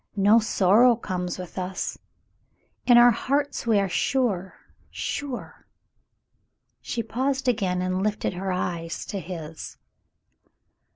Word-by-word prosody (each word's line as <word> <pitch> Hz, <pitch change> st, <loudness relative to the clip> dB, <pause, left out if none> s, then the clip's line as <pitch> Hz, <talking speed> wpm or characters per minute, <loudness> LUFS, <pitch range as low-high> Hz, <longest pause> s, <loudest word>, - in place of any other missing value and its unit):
No 205 Hz, +3 st, +5 dB
sorrow 220 Hz, +3 st, +4 dB
comes 180 Hz, -5 st, -4 dB
with 180 Hz, 0 st, -7 dB
us. 185 Hz, +1 st, -4 dB, 0.9 s
In 245 Hz, -1 st, +7 dB
our 240 Hz, 0 st, +8 dB
hearts 280 Hz, +3 st, -1 dB
we 220 Hz, -2 st, +4 dB
are 195 Hz, -, +1 dB
sure 195 Hz, -2 st, 0 dB, 0.2 s
— -, -, -36 dB
sure 280 Hz, -3 st, -5 dB, 0.3 s
— -, -, -49 dB
'* -, -, -48 dB, 0.3 s
She 230 Hz, -, -3 dB
paused 265 Hz, +3 st, -2 dB
again 190 Hz, -7 st, +1 dB
and 185 Hz, 0 st, -1 dB
lifted 210 Hz, -1 st, -1 dB
her 190 Hz, +1 st, -3 dB
eyes 170 Hz, -2 st, -3 dB
to 200 Hz, -, -4 dB
his. 165 Hz, -3 st, -8 dB
200 Hz, 130 wpm, -25 LUFS, 180-240 Hz, 0.9 s, our